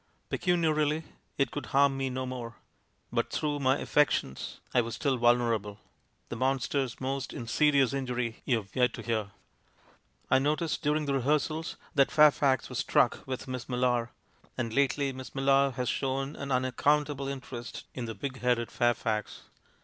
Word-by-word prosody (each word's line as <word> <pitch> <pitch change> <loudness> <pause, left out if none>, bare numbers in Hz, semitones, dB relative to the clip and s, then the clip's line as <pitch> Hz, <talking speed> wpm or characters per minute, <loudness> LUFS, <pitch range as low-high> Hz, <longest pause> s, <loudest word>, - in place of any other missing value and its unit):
Pecuniarily 160 -3 +1 0.3
it 140 - +1
could 145 - -5
harm 140 -1 +3
me 135 0 -1
no 130 0 -3
more, 120 -3 -6 0.6
but - - 0
through 150 -1 -1
my 135 0 +3
af - - -7
fections 145 - +1 0.2
I 125 - +5
was 115 -1 -4
still 135 +1 +1
vulnerable; 115 -4 +2 0.5
the - - -4
monster's 130 0 0
most 135 -1 -3
insidious 135 +2 +2
injury 125 -4 -2
you've 110 -7 -1
yet 125 -1 +2
to 115 - -8
hear. 110 -3 -1 1.0
"I - - +4
noticed 155 +4 0
durinfr 150 +1 +1
the 140 - 0
rehearsals 150 +4 0 0.2
that 140 -1 +4
Fairfax 145 -4 +4
was - - -4
struck - - +2
with 130 +1 -4
Miss 130 -1 -5
Millar; 125 -1 +1 0.5
and 115 -2 -2
lately 140 +1 +1
Miss 130 +1 -9
Millar 135 0 +4
has 125 0 -3
shown 135 +3 -1
an 140 0 -5
unaccountable 140 +3 +1
interest 130 -3 -6
in 125 - -4
the 115 -1 -5
big 130 -2 -5
headed 120 -2 +1
Fairfax. 115 -3 0
130 Hz, 155 wpm, -29 LUFS, 120-140 Hz, 1.0 s, I